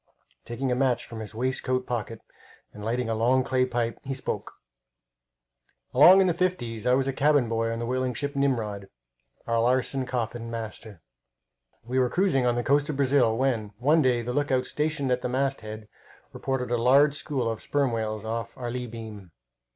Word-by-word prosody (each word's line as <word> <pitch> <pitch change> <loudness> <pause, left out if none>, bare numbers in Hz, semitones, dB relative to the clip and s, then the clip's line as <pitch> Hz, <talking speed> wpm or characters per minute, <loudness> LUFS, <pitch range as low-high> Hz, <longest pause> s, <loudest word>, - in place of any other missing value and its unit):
Taking 125 +2 -3
a - - +2
match 130 -1 +1
from 115 - -8
his 110 -1 -8
waistcoat 130 +1 -1
pocket 115 -2 -4 0.5
and 105 - -10
lighting 120 +2 -1
a 115 - 0
long 125 +4 +2
clay 130 -1 +1
pipe, 120 -2 -2
he 135 0 -4
spoke: 130 - -5 1.4
Along 175 +9 +8
in - - +4
the 180 - +2
fifties 145 - -2
I 125 - +5
was 135 0 +1
cabin 140 -1 +3
boy 115 0 0
on 115 - -3
the 115 - -3
whaling 130 0 -1
ship 145 +3 -3
Nimrod, 110 -8 -1 0.6
Alarson 125 +3 +1
Coffin, 120 -2 -3
master. 110 -5 -7 0.8
We 125 +3 -1
were 125 -1 +2
cruising 145 -8 +2
on 120 - +2
the 120 - -1
coast 145 +3 +2
of 150 - -2
Brazil 130 -5 +3
when, 115 -6 0
one 150 +7 +3
day, 125 -3 +2
the 125 +1 -3
lookout, 135 -2 +1
stationed 150 -3 -1
at 125 0 +1
the 125 - -2
masthead, 120 -5 -3 0.5
reported 130 -2 -3
a 120 - +2
large 140 +4 +5
school 140 -4 -2
of 115 -1 -3
sperm 140 -3 0
whales 110 -2 -3
off 115 +1 -4
our 120 -1 -4
lee 125 0 -4
beam. 110 -5 -9
125 Hz, 180 wpm, -26 LUFS, 115-135 Hz, 1.4 s, Along